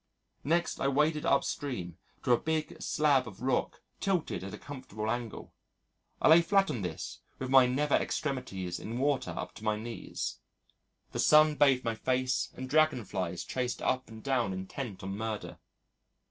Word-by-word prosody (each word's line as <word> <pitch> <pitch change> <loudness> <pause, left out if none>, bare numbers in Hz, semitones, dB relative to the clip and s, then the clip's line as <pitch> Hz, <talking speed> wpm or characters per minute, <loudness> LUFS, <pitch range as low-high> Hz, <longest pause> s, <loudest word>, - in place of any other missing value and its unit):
Next 170 +4 +1
I - - +1
waded 150 +2 +2
upstream 95 - -1 0.2
to 125 - +1
a 120 - +5
big 160 -1 -2
slab 145 -5 +2
of 105 +2 -10
rock 130 -1 0 0.2
tilted 180 - -1
at 95 - -6
a - - -7
comfortable 110 -6 -5
angle. 120 -2 -5 0.7
I - - +3
lay 165 +2 +9
flat 195 0 +3
on 120 -7 -3
this 90 -4 -5 0.2
with 130 0 -4
my 130 -2 +8
nether 140 +4 +2
extremities 95 - -3
in 115 +2 -5
water 140 +1 +1
up - - -5
to 110 - -12
my 110 -1 +1
knees. 115 +2 -5 0.7
The - - -4
sun 155 0 +6
bathed 135 -3 +4
my 115 - +1
face 130 +3 0
and 130 - -6
dragon 155 -5 +3
flies 90 -3 -3
chased 125 -1 -2
up 130 -1 0
and 110 -1 -11
down 125 -8 +1
intent 95 +2 -6
on 95 +1 -4
murder. 110 0 -4
130 Hz, 165 wpm, -31 LUFS, 110-145 Hz, 0.7 s, lay